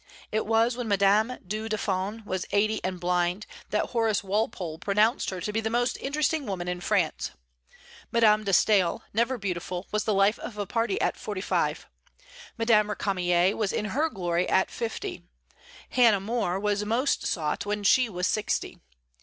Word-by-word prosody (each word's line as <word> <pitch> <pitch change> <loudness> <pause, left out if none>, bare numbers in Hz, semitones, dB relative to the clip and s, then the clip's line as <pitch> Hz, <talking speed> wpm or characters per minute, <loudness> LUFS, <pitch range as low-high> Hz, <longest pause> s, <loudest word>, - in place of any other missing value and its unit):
It 215 -1 -1
was 225 +2 +3
when 245 -2 -4
Madame 205 +4 +3
du 215 +4 -4
Deffand 205 +1 -2
was 185 -2 -3
eighty, 215 +2 +1
and 185 -1 -3
blind, 180 +2 0 0.2
that 210 - -1
Horace 225 -4 +1
Walpole 195 -5 -2
pronounced 210 +6 +2
her 185 - -5
to 210 +4 -3
be 225 - 0
the 220 - -1
most 240 +1 +1
interesting 295 +1 0
woman 180 -3 -3
in 180 0 -3
France. 185 -5 0 0.8
Madame 215 -2 +4
de 200 - -1
Staël, 190 -2 +3
never 235 +4 +1
beautiful, 180 -2 -4
was 210 0 -1
the 215 - +1
life 200 +3 +3
of 215 - -7
a 205 - -2
party 230 0 -1
at - - 0
forty 205 -3 -5
five; 190 - -1 0.7
Madame 225 -2 +3
Récamier 185 -3 +1
was 210 -3 -1
in 210 - -2
her 310 +4 +1
glory 175 - -1
at 190 - +2
fifty; 355 - -4 0.7
Hannah 230 -5 +5
More 195 -3 -1
was 205 0 0
most 235 +6 0
sought 160 +4 -2
when 210 0 -2
she 250 +4 +4
was 180 -3 -2
sixty. 215 +2 -1
210 Hz, 170 wpm, -27 LUFS, 190-225 Hz, 0.8 s, Hannah